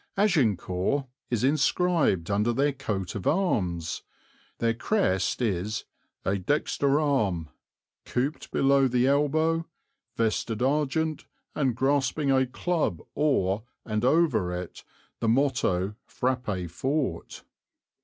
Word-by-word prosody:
"Agincourt" 135 - +1 0.2
is 120 -2 0
inscribed 145 - +2
under 105 +4 +2
their 140 +4 +1
coat 100 -9 -3
of 100 - -4
arms; 90 - 0 0.6
their 115 -1 +1
crest 115 - 0
is 105 0 -1 0.4
"a 100 +1 +1
dexter 140 +5 +1
arm 105 - 0 0.5
couped 135 +5 -2
below 135 0 +3
the 125 0 +2
elbow, 155 +4 +2 0.5
vested 115 0 0
argent, 150 +3 0 0.3
and 130 -5 0
grasping 135 +2 +1
a 130 -1 +3
club 155 - -1
or, 110 -10 +1 0.2
and 110 0 -2
over 130 - +3
it 90 -1 -6 0.4
the 115 - -1
motto 115 -7 +1
Frappe 120 -8 -2
fort." 130 - -3
130 Hz, 105 wpm, -27 LUFS, 100-145 Hz, 0.6 s, below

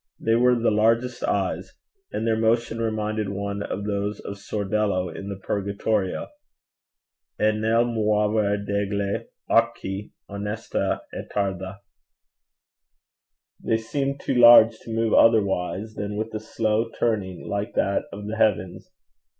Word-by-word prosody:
They 115 - +1
were 125 +2 +4
the 115 -1 +1
largest 115 +4 +1
eyes; - - -1 0.4
and - - -2
their 115 -1 +2
motion 115 +1 +1
reminded 110 -2 -1
one 100 +1 -3
of 100 0 -4
those 100 0 -2
of 100 0 -7
Sordello 100 -3 -1
in 100 - -6
the 100 - -4
Purgatorio: 100 0 -1 1.2
E 105 0 +4
nel 110 +2 +2
muover 105 -2 +1
degli 100 0 -1 0.2
occhi 105 -4 0 0.2
onesta 105 +2 -3
e - - -4
tarda: 95 -1 -3 1.8
they 115 - +2
seemed 135 +5 -2
too - - -2
large 120 -2 +8
to 115 - -10
move 115 0 0
otherwise 105 -1 +3
than 105 0 -4
with 110 +1 -3
a 110 - -2
slow 110 +1 -1
turning 100 -6 -1
like 100 +3 -3
that 100 - +1
of 105 0 -7
the 110 +2 -4
heavens. 95 -5 0
105 Hz, 130 wpm, -24 LUFS, 100-115 Hz, 1.8 s, large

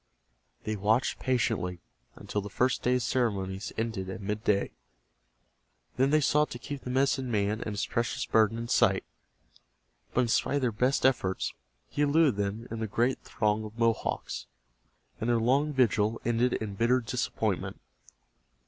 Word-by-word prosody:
They 110 +1 -2
watched 110 +5 +1
patiently 90 -9 0 0.4
until 105 - -3
the 100 - -7
first 125 +6 +1
day's 125 0 +1
ceremony 100 -7 -1 0.2
ended 110 -4 -2
at 95 - -5
midday. 105 0 0 1.2
Then 135 +2 +3
they 155 +1 +4
sought 150 +1 +3
to - - -6
keep 140 +3 -6
the - - -7
medicine 130 0 +1
man 105 -1 0
and 110 - -3
his 100 - -1
precious 115 0 -1
burden 110 0 +3
in 115 0 -4
sight, - - +3 1.1
but 125 - +4
in 125 - +1
spite 115 - +1
of 145 - +1
their 125 -2 +1
best 125 +6 +1
efforts 115 -8 +1 0.3
he 145 - -3
eluded 145 -5 +4
them 105 +3 -2
in 115 - -4
the 110 - -2
great 120 +5 0
throng 105 -1 0
of 110 +1 -9
Mohawks, 115 -1 -1 0.7
and 110 - -1
their 120 - +4
long 135 +6 +2
vigil 115 -4 +2
ended 120 +2 +2
in 105 -2 -3
bitter 120 +5 +3
disappointment. 115 - -2
115 Hz, 155 wpm, -29 LUFS, 105-125 Hz, 1.2 s, they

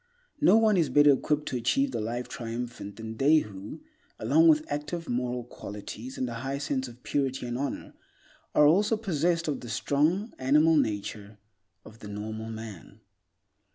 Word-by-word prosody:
No - - +6
one 220 -3 +4
is 160 -5 +2
better 145 +2 +6
equipped 150 +2 0
to 125 - -2
achieve 265 - +1
the - - -2
Life 120 +3 -3
Triumphant 115 -3 -6
than 110 0 -7
they 145 +5 +5
who, 105 - -5 0.4
along 330 +1 +4
with 310 -1 +5
active 150 +3 -4
moral 125 0 -2
qualities 110 +2 -8
and 130 - -1
a 120 - -5
high 135 +4 -3
sense 140 -2 -2
of 120 +1 -14
purity 135 -3 -1
and 120 0 -3
honor, 140 +3 -4 0.6
are 150 - +6
also 205 +8 +4
possessed 170 -4 0
of 150 - -1
the 120 - -9
strong 155 - 0
animal 150 +5 +4
nature 105 -4 -2 0.5
of 110 +1 -14
the 105 - -9
normal 110 +2 -5
man. 110 -5 -9
130 Hz, 165 wpm, -28 LUFS, 115-155 Hz, 0.6 s, No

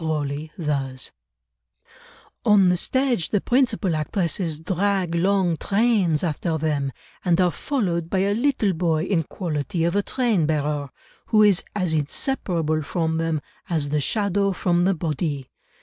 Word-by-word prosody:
Grosley 150 -1 -2
thus— 135 -5 -3 1.3
"On 200 -3 +5
the 180 - +3
stage 250 -1 0
the 205 - +2
principal 235 -7 +1
actresses 160 0 -1
drag 190 0 0
long 180 -1 +2
trains 200 -7 +2
after 165 0 -1
them, 145 -3 -1 0.3
and 175 -1 +2
are 180 -1 +4
followed 170 - -2
by 190 - 0
a 195 +2 +2
little 230 -4 +1
boy 165 -2 +1
in 185 -2 +1
quality 160 -1 -3
of 170 +2 +1
a 205 - +3
train 215 - +1
bearer, 150 -2 -1 0.4
who 215 -2 +5
is 200 -3 +4
as 180 -5 0
inseparable 155 - -1
from 160 +1 -1
them 165 -2 -1 0.3
as 155 -5 0
the 150 0 +1
shadow 200 +3 +1
from 175 -1 +1
the 195 0 +2
body. 150 -4 -2
170 Hz, 145 wpm, -23 LUFS, 155-200 Hz, 1.3 s, On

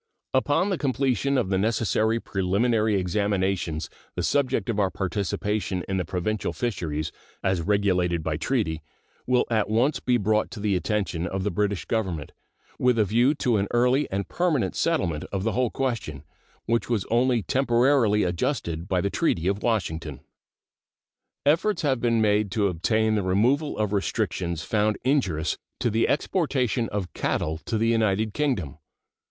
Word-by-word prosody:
Upon 145 +8 +2
the 185 - -1
completion 135 -1 +1
of 120 -7 0
the 95 -1 +1
necessary 110 +1 +1
preliminary 105 +3 +1
examinations 95 -3 0 0.3
the - - -2
subject 130 -7 +1
of 110 -3 -1
our 95 -2 +2
participation 95 0 -2
in 95 - -1
the 90 - -1
provincial 95 +4 -2
fisheries, 85 - -3 0.3
as 95 -3 +1
regulated 90 -3 +1
by 75 -1 -1
treaty, 90 - -1 0.5
will 125 0 +3
at 110 -2 +1
once 120 +7 +2
be 125 -1 +2
brought 110 0 +1
to 110 - -8
the 100 -1 +1
attention 90 -3 -1
of 95 0 -3
the 105 - 0
British 100 +1 -1
Government, 95 -10 -2 0.5
with 125 -1 +3
a 110 - +4
view 120 +8 +3
to 120 -5 +1
an 100 0 0
early 125 +4 +2
and 100 0 -2
permanent 170 -8 0
settlement 95 - 0
of 95 -1 -2
the 115 - +1
whole 125 0 +1
question, 115 - -3 0.4
which 115 +1 0
was 115 -5 0
only 120 -1 +2
temporarily 120 -4 +3
adjusted 85 - -2
by 95 -3 +1
the 100 - -1
treaty 90 - 0
of 100 +2 0
Washington. 80 - -2 1.2
Efforts 175 +7 +2
have 135 -4 +1
been 115 -1 +2
made 105 -1 +2
to 100 0 +1
obtain 110 +6 +1
the 105 - +1
removal 120 +11 +1
of 105 -1 -1
restrictions 90 -5 -1
found 105 +2 +1
injurious 95 - 0 0.2
to 120 -3 0
the 115 +2 +2
exportation 135 - 0
of 100 -4 -4
cattle 80 0 -1
to 115 - -1
the 115 +1 +2
United 110 -2 +1
Kingdom. 105 - -1
105 Hz, 160 wpm, -25 LUFS, 95-120 Hz, 1.2 s, a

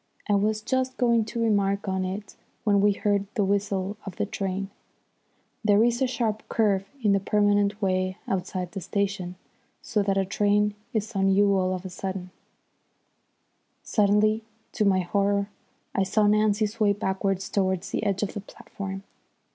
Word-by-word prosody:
I 210 - +2
was 215 +2 +1
just 260 +2 -1
going 235 -3 +3
to 235 - -5
remark 200 -2 +1
on 190 -1 0
it 195 +2 -5 0.3
when 205 -2 +3
we 205 0 +4
heard 200 0 0
the 205 -4 +2
whistle 200 0 -1
of 195 -3 -7
the - - -1
train. 195 -1 -3 0.9
There 210 0 +5
is 240 +2 +1
a 260 - +3
sharp 225 -3 -1
curve 200 -4 +2 0.2
in 210 - +4
the 200 - +4
permanent 205 +1 +2
way 185 0 0
outside 185 -1 -2
the 195 - -5
station, 195 -2 -2 0.5
so 210 - 0
that 195 -1 +1
a 195 - +2
train 205 +1 +2 0.2
is 220 -1 -2
on 195 0 +3
you 200 +1 +4
all 185 -1 +1
of 185 +1 -7
a 185 - -6
sudden. 185 0 -5 1.5
Suddenly 210 +1 +3 0.3
to 210 - 0
my 190 -2 +4
horror 200 +2 +1 0.4
I - - +1
saw 205 +3 +2
Nancy 210 0 +3
sway 210 -1 +1
backwards 195 -1 -1
towards 190 -1 -1
the - - -1
edge 200 -1 0
of 205 - -2
the 205 - -5
platform. 195 -1 -8
200 Hz, 165 wpm, -26 LUFS, 195-210 Hz, 1.5 s, There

